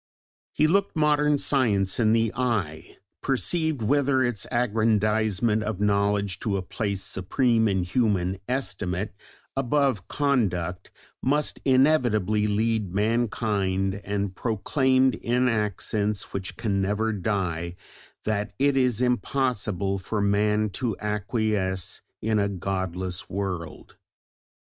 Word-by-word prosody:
He 155 - +2
looked 195 +5 +2
modern 150 -1 +3
Science 105 -10 +1
in 110 -2 +4
the 115 -1 +2
eye, 105 -12 -2 0.2
perceived 155 0 0
whither 135 +2 +2
its 120 -5 -1
aggrandisement 110 -2 +1
of 110 -3 -3
knowledge 100 -2 +1
to 100 -3 -1
a 95 - -3
place 100 0 -3
supreme 110 +4 +1
in 95 -3 +1
human 95 -2 0
estimate, 105 -6 -2 0.4
above 135 -6 +1
conduct, 95 - 0 0.3
must 145 +3 0
inevitably 120 -7 +3
lead 105 -2 0
mankind, 100 -3 0
and 100 -2 -2
proclaimed, 130 +5 +2
in 125 +2 0
accents 105 -2 -1
which 95 -1 -5
can 100 -4 0
never 105 +3 0
die, 90 -4 -2 0.5
that 105 -1 -2
it 140 0 +2
is 125 -3 +2
impossible 115 -6 0
for 105 +3 -3
man 105 +1 +2
to 115 +1 -2
acquiesce 105 -3 -1 0.2
in 110 0 +2
a 100 0 +1
godless 95 -1 -3
world. 90 -4 -5
105 Hz, 110 wpm, -25 LUFS, 100-125 Hz, 0.5 s, in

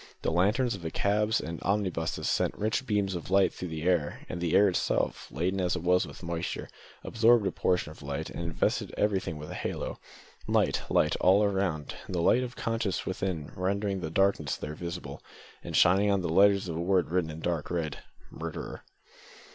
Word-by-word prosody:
The - - +1
lanterns 105 +9 +2
of 95 - -7
the 80 - -3
cabs 105 +5 +1
and 85 +1 -6
omnibuses 95 -5 -1
sent - - 0
rich 110 +5 -1
beams 100 -3 +1
of 85 -1 -5
light 95 0 +4
through 90 - -5
the 80 -1 -5
air, 85 -4 0
and 85 - -5
the 85 0 +1
air 105 - +7
itself, 90 - -1
laden 90 +6 -1
as 90 0 +1
it - - -4
was 90 +1 +3
with - - -11
moisture, 85 +1 -4 0.3
absorbed 115 -1 +4
a - - +1
portion 90 -4 0
of 80 - -13
light, 70 -1 -4
and - - -5
invested 85 -1 -1
everything 95 -6 0
with 75 0 -8
a - - -5
halo. - - -4 0.5
Light, - - +2
light! - - +3
all 100 +3 +4
round, 95 -7 -1
and 95 - -4
the 85 - +1
light 125 - +4
of 125 -1 -5
conscience 115 -4 -2
within 90 -5 -3
rendering 100 +1 -1
the 80 - -4
darkness 90 -5 +1
there 75 - -5
visible, 85 -4 -6 0.4
and - - -2
shining 95 +4 +5
on 100 -1 +2
the 90 - -2
letters 100 +3 +4
of 85 - -4
a - - -2
word 90 -2 +1
written 90 -2 +1
in 80 +1 -7
dark 85 -2 -2
red 80 -4 -2 0.3
"Murderer!" - - -6
90 Hz, 195 wpm, -29 LUFS, 85-100 Hz, 0.5 s, air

